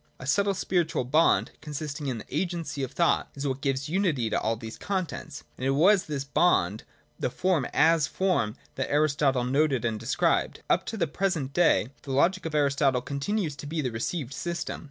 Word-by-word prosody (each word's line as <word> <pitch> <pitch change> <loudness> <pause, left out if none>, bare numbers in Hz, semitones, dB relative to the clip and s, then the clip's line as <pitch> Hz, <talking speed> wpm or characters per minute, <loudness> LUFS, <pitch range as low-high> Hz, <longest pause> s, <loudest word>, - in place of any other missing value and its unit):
A - - -8
subtle 200 +8 +2
spiritual 175 -7 0
bond, 155 +7 +3
consisting 150 -1 -5
in 130 -3 -2
the 110 - -8
agency 170 -3 -2
of 130 - -3
thought, 170 - +1
is 140 +1 -4
what 135 0 -2
gives 135 0 -1
unity 155 - 0
to - - +1
all 115 - 0
these 110 0 -9
contents, 185 -3 -4 0.2
and - - -6
it 135 - +2
was 190 +4 +5
this 145 -3 -3
bond, 115 - +2 0.3
the - - 0
form 165 -1 0
as 160 -3 +4
form, 175 - 0 0.2
that 130 - -3
Aristotle 140 -3 +2
noted 135 -1 +1
and 110 -2 -1
described. - - 0
Up - - +2
to 225 - -4
the 185 - +2
present 160 -4 -2
day, 170 -9 +3
the 135 - -5
logic 170 +6 +2
of 155 - -5
Aristotle 140 -3 +2
continues 150 +5 -2
to 145 - -7
be 160 +2 -3
the 130 -5 -1
re 115 - -5
ceived 140 0 -3
system. 170 +1 -4
145 Hz, 195 wpm, -27 LUFS, 130-170 Hz, 0.3 s, was